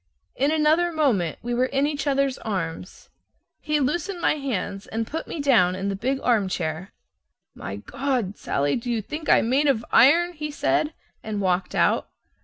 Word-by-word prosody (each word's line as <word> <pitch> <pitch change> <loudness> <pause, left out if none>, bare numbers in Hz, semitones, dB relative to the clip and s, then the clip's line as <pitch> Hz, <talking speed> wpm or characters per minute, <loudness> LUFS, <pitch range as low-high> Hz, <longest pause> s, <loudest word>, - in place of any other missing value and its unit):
In 280 +2 +1
another 315 +3 +3
moment 250 - +1
we 240 +1 -2
were 250 +2 +2
in 275 +1 +1
each 290 -1 -2
other's 275 -1 +1
arms. 180 -5 -5 0.5
He 300 -1 0
loosened 345 +7 -1
my - - +2
hands, 235 -9 -4
and 225 +1 -2
put 320 +8 -5
me 330 - -6
down 225 -11 +3
in 195 +1 -3
the 195 - -2
big 260 +7 -1
armchair. 185 -7 0 0.6
"My 100 - -7
God! 240 - -2
Sallie, 140 +1 -1
do 245 +1 -6
you 230 -3 -1
think 305 +6 -6
I'm - - +5
made 275 +5 +2
of 235 -5 +1
iron?" 340 +8 +5
he 300 -2 -5
said 300 +1 0 0.3
and 215 -2 -4
walked 185 -1 0
out. - - +2
255 Hz, 175 wpm, -24 LUFS, 195-295 Hz, 0.6 s, I'm